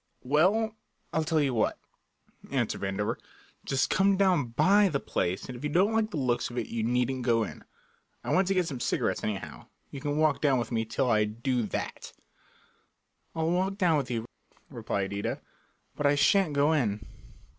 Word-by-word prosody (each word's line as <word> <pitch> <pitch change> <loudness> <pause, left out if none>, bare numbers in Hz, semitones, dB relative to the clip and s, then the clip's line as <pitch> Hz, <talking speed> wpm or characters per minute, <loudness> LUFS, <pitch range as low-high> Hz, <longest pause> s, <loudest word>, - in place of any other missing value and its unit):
"Well, 195 - +2 0.4
I 160 - +2
tell 160 0 +1
you 140 -3 +1
what," 110 - +1 0.7
answered - - -1
Vandover, 100 +1 -2 0.5
"just 135 -1 0
come 195 0 +3
down 185 -9 +3
by 195 - +4
the 140 -4 -1
place, 90 -7 -2
and 125 - -7
if 120 - -10
you 150 - -1
don't 190 +8 +3
like 220 -1 +1
the 185 - -5
looks 125 -3 0
of 120 - -8
it 120 - -2
you 115 - -2
needn't 125 +3 0
go 115 -2 +2
in. - - -8 0.6
I - - -1
want 185 0 +3
to 195 - +1
get 180 -1 +2
some 140 -6 -5
cigarettes, - - -1
anyhow. 105 -3 -5 0.2
You 140 - -7
can 145 0 -2
walk 155 -2 +2
down 140 -3 +3
with 120 -1 -3
me 115 -1 0
till 115 +3 -1
I 105 -1 +3
do 120 +4 -1
that." - - -5 1.2
"I'll 160 0 0
walk 190 +2 0
down 180 -5 +3
with 135 -4 -2
you," 115 -2 -2 0.5
replied 100 0 -3
Ida, 100 0 -3 0.6
"but 145 - +1
I 145 - +4
shan't 155 +4 +3
go 145 +2 +3
in." 110 -9 0
140 Hz, 190 wpm, -28 LUFS, 115-175 Hz, 1.2 s, by